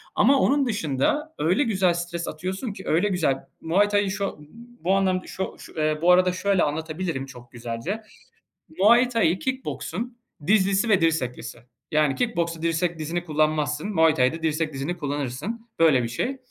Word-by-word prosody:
Ama 270 +5 +5
onun 275 +1 +3
dışında 215 - -1
öyle 180 - +2
güzel 190 -7 +2
stres 170 0 -4
atıyorsun 190 - -4
ki, 190 - -10
öyle 170 +6 +2
güzel 165 -8 +1 0.2
Muay 195 +6 +2
Thai 205 -1 +2
şo 195 -4 -3
b 150 - -14 0.4
bu 190 +3 +3
anlamda 185 -1 +1
şo 190 - -4
şu - - -12
eee, 155 0 +1
bu 175 +2 +5
arada 180 0 +5
şöyle 190 0 +1
anlatabilirim 155 -1 -3
çok 125 -3 -13
güzelce: 120 - -4 0.8
Muay 235 +6 +5
Thai, 215 -8 +2
kick 260 -2 -3
boksun 240 +1 -5 0.3
dizlisi 200 +2 +3
ve 195 -5 +4
dirseklisi. 125 -8 -1 0.3
Yani 150 -2 +2
kick 240 -2 -1
boksta 165 -1 -1
dirsek, 165 +1 0
dizini 170 +3 -3
kullanmazsın; 155 +1 0
Muay 160 -1 +5
Thai'da 150 +4 +1
dirsek, 155 0 0
dizini 140 +6 -3
kullanırsın, 145 - -4
böyle 155 -7 +5
bir - - -1
şey. 240 - -2
170 Hz, 165 wpm, -24 LUFS, 155-200 Hz, 0.8 s, Ama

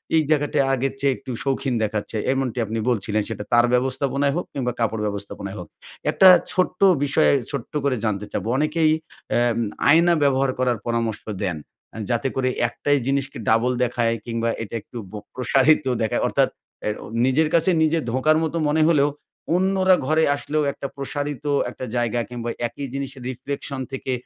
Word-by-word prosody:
এই 160 - +5
জায়গাটা 145 -2 +1 0.2
আগের 135 +1 0
চেয়ে 140 -1 +2
একটু 130 - -8
শৌখিন 135 -1 -1
দেখাচ্ছে। 105 +1 -2 0.2
এমনটি 130 -3 -2
আপনি 110 +2 -3
বলছিলেন 105 -2 0
সেটা 105 - -4
তার 120 0 +6
ব্যবস্থাপনায় 135 +2 +1
হোক 180 - -2
কিংবা 125 -3 -1
কাপড় 110 -1 0
ব্যবস্থাপনায় 100 -1 -5
হোক। 90 - -8 0.4
একটা 190 - +6 0.2
ছোট্ট 185 0 0 0.2
বিষয় 140 - +3 0.2
ছোট্ট 140 -5 -5
করে 140 -3 +1
জানতে 105 -1 -1
চাবো। - - -3
অনেকেই 155 +1 +2 0.4
অ্যাম 120 -1 +2 0.3
আয়না 170 +3 +6
ব্যবহার 135 -1 +2
করার 125 -2 +1
পরামর্শ 115 -2 -1 0.2
দেন। 90 -5 -1 0.3
অ্যা 115 - -9
যাতে 120 +3 0
করে 130 -1 +1 0.2
একটাই 145 +4 0
জিনিসকে 140 0 -1
ডাবল 115 +3 +3
দেখায় 115 -1 0
কিংবা 115 0 -1
এটা 110 - -7
একটু 120 - -11
ব - - -20 0.2
প্রসারিত 135 +4 +3 0.2
দেখায়। 110 - 0
অর্থাৎ - - +2 0.3
অ্যাও 105 0 -4 0.2
নিজের 150 +4 +2
কাছে 170 +2 +3
নিজে 160 +1 +2
ধোঁকার 155 +5 +3
মত 160 - -2
মনে 155 +2 +2
হলেও 145 -3 +4 0.5
অন্যরা 190 0 +3
ঘরে 160 +1 +3
আসলেও 150 +1 -1
একটা 140 - -6
প্রসারিত 145 0 -4 0.2
একটা 130 - -7
জায়গা 120 0 0
কিংবা, 120 -1 -5 0.2
একই 140 +4 -7
জিনিসের 135 -1 -5
Riflection 140 +2 -5
থেকে 135 0 -4
130 Hz, 165 wpm, -23 LUFS, 115-145 Hz, 0.5 s, তার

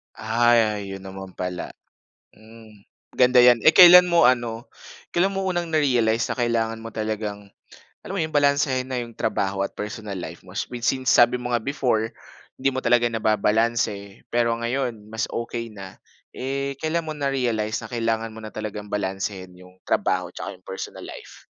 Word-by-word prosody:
Ah, 115 -1 +2
yo 100 -1 -6
'yon 95 - -9
naman 95 -1 -9
pala. 90 -1 -5 0.6
Hmm, 110 -1 -17 0.3
ganda 125 0 +4
'yan. 120 -1 +6
Eh - - +8
kailan 180 +1 +9
mo 170 -4 +5
ano, 120 -2 0 0.5
kailan 180 +3 +3
mo 195 -1 -3
unang 175 -2 -2
na-realize 120 -7 +2
na - - -3
kailangan 115 -2 -1
mo 115 - -7
talagang 105 -2 -5 0.5
alam 195 - -7
mo - - 0
'yon 155 0 -4
balansehin 140 -3 +2
na 130 - -3
'yong 120 -1 -5
trabaho 95 -3 -2
at 100 - -3
personal 105 -1 -6
life 85 -1 -7
mo 95 +1 -14
since 125 +3 0
sabi 120 +1 +5
mo 125 0 -5
nga 120 - +2
before, 120 -4 -1 0.4
hindi 135 +1 +1
mo 130 - -2
talaga 120 -1 +3
nababalanse 110 -1 0
pero 115 -1 +2
ngayon 120 -2 -3
mas 110 +1 -2
okey 115 0 -4
na. 95 -3 -11 0.3
Eh 140 +1 -4
kailan 160 +1 -1
mo 155 - -4
na-realize 125 -7 -1
na - - -10
kailangan 115 -1 -1
mo 110 - -10
na 110 - -7
talagang 105 -1 -6
balansehin 95 -2 -4
'yong 90 +1 -18
trabaho - - 0
'tsaka - - -7
'yong 90 - -31
personal 95 - -7
life? - - -11
115 Hz, 170 wpm, -23 LUFS, 105-130 Hz, 0.6 s, kailan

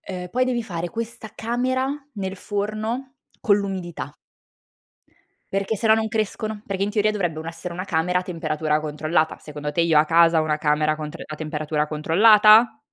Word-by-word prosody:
Ehm, 180 -1 -7
poi 255 +4 +1
devi 245 -2 -1
fare 175 -5 -4
questa 230 +3 -6
camera 255 +3 -1 0.3
nel 190 -2 -4
forno 215 +7 -4 0.2
con 205 -2 +4
l'umidità 185 -7 -5 1.4
perché 195 +2 0
se 215 - -4
no, 220 - +6
non 220 0 +1
crescono, 215 -1 -3
perché 195 -1 -4
in 200 - +1
teoria 210 0 +2
dovrebbe 175 -7 -2
u 160 - -5
essere 165 +1 -6
una 180 - -4
camera 180 0 0
a - - -4
temperatura 155 -3 -1
controllata. 155 +1 -1
Secondo 150 -1 -6
te, 170 +3 +1
io 160 -2 +4
a 150 - +5
casa 165 0 +4
ho - - -1
una 150 -1 0
camera 155 0 +1
con 155 -1 -6
tr - - -10
a 155 - -8
temperatura 150 0 -2
controllata? 215 - +5
180 Hz, 180 wpm, -23 LUFS, 155-215 Hz, 1.4 s, no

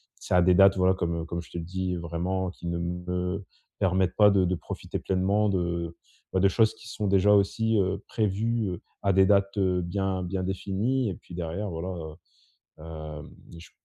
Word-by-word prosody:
ça 90 - 0
a - - +6
des 90 - +5
dates, 100 0 +6
voilà, 95 0 +4
comme 85 -2 -2
comme 85 +1 -4
je 85 - -16
te - - -6
le 85 - -3
dis, 90 +1 -2
vraiment, 90 +2 -2
qui 90 - -9
ne 85 0 -1
me 90 +2 -3 0.3
permettent 95 -1 +1
pas 105 -1 +7
de 95 -2 +3
de 90 +1 +1
profiter - - -6
pleinement 100 +3 +1
de, 85 -2 -2 0.4
bah, 95 - +2
de 100 - +5
choses 110 +3 +3
qui 110 +2 -14
sont 105 -4 -3
déjà 100 +1 +4
aussi, 110 +3 +2
heu, 95 +2 0
prévues, 110 +1 0
heu, 90 - -8 0.2
à 100 - +3
des 95 0 +5
dates, 100 0 +2
heu, 90 -2 +2
bien 95 +1 -2
bien 95 +1 -3
définies. 100 +7 -1
Et 95 - -4
puis 85 - -12
derrière, 90 +4 -3
voilà, 85 +1 -4 0.9
heu, - - -13
hem, 80 -2 -8 0.3
je 85 - -13
95 Hz, 200 wpm, -27 LUFS, 85-100 Hz, 0.9 s, pas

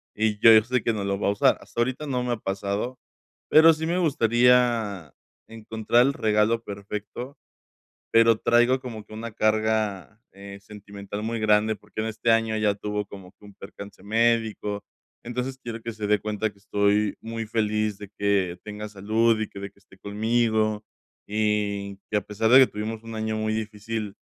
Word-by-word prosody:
y 105 -1 0
yo 115 - +7
sé 125 0 0
que 115 - +1
no 100 -2 -3
lo 100 0 -2
va - - 0
a - - +3
usar, 100 - +3
hasta 120 - -4
ahorita 130 +5 -2
no 125 -2 -1
me 125 - -2
ha - - -3
pasado, 100 +5 -3 0.5
pero 160 +1 +8
sí 160 +1 -4
me 170 +2 0
gustaría 120 - +2 0.3
encontrar 115 +2 +1
el 140 - 0
regalo 110 +1 +1
perfecto, 105 +6 -7 0.7
pero 115 -1 +5
traigo 120 +2 +3
como 115 -4 -7
que 110 - -14
una 115 +1 -6
carga, 110 -1 0
eh, 100 0 -10
sentimental 100 0 -8
muy 115 +1 -2
grande, 110 0 +3
porque 105 +1 -7
en 110 - -2
este 110 +1 -2
año 115 -1 +2
ella 105 -2 +1
tuvo 105 0 -3
como 95 -2 -12
que 105 - -20
un 100 - -14
percance 100 0 -11
médico, 110 -1 0 0.4
entonces, 125 +2 -4
quiero 115 -2 -6
que 115 - -5
se 105 -2 -4
dé 105 0 +3
cuenta 105 0 -2
que 100 - -25
estoy 100 +1 +1
muy 115 0 -5
feliz 105 -1 -1
de 100 -1 -10
que 100 -3 +1
tenga 105 0 -7
salud 110 +3 +1
y 110 - -3
que 100 - -10
de 100 0 -6
que 100 - -28
esté 95 - -21
conmigo, 110 +1 0 0.4
y 105 -2 -1
que 105 - +2
a 105 - 0
pesar 110 +3 -1
de 130 - +9
que 130 - +7
tuvimos 110 +1 -5
un 115 0 -8
año 110 0 -2
muy 110 0 -1
difícil, 110 -1 -4
110 Hz, 185 wpm, -25 LUFS, 105-115 Hz, 0.7 s, de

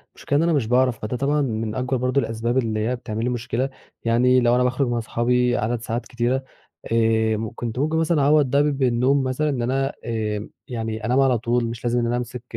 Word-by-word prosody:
المشكلة 145 - -1
إن 160 - +3
أنا 170 - +2
مش 135 -7 +1
باعرف 125 -1 +2
فده 110 +4 -3
طبعًا 145 +3 +1
من 110 -4 -2
أكبر 130 0 -1
برضه 130 +3 +1
الأسباب 115 +3 -2
اللي 110 -4 0
هي 125 - 0
بتعمل 110 -2 -5
لي 125 - 0
مشكلة 125 +2 -2 0.4
يعني 125 +2 +4
لو 120 0 +3
أنا 125 - +3
باخرج 130 +1 +1
من 120 0 -1
أصحابي 120 +2 +1
عدد 115 +1 -1
ساعات 120 +1 -3
كتيرة 125 +2 -1 0.5
آمم، 110 -1 +1
كنت 120 0 -4
ممكن 155 +3 +1
مثلًا 160 -2 +2
أعوّض 145 +1 +4
ب 145 0 +2
بالنوم 130 +1 +2
مثلًا 130 +4 0
إن 130 -4 -1
أنا 135 +3 0
آمم، 110 -2 -3 0.2
يعني 110 -3 -4
أنام 125 +4 +2
على 130 -3 +4
طول 120 +1 0
مش 115 0 -6
لازم 120 0 +1
إن 120 - 0
أنا 120 - 0
أمسك 125 0 -5
125 Hz, 215 wpm, -23 LUFS, 115-130 Hz, 0.5 s, يعني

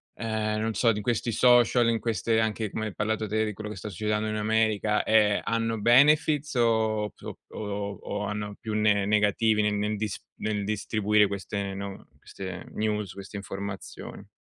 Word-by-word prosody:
ehm, 110 -1 -2
non 110 0 -1
so 115 +1 +3
di 105 -1 -3
questi 115 +2 -1
social, 120 0 +5
in 115 -1 +1
queste 115 0 0
anche 110 -1 -1
come 110 - -3
hai 105 - -8
parlato 110 +1 -1
te, 110 +2 0
di 105 - -3
quello 105 +1 -7
che 105 - -6
sta 95 +3 -6
succedendo 105 +3 -1
in 110 - -2
America, 110 -1 +1
ehm, 105 -2 +3
hanno 115 0 -1
benefits 145 +5 +4
o 110 -3 +1
so - - -9
o - - -9
o 100 -1 -4
o 105 0 -4
hanno 105 0 -4
più 110 - -5
ne 105 -2 +2
negativi 105 +1 +2
nel 105 0 +1
nel 105 +1 -1
dis 105 -1 -3 0.2
nel 105 -1 -2
distribuire 105 0 +2
queste 100 0 -4
no 100 0 -7
queste 95 -2 -8
news 105 -2 -2
queste 100 +1 -8
informazioni? 100 0 -7
105 Hz, 180 wpm, -27 LUFS, 105-110 Hz, 0.2 s, social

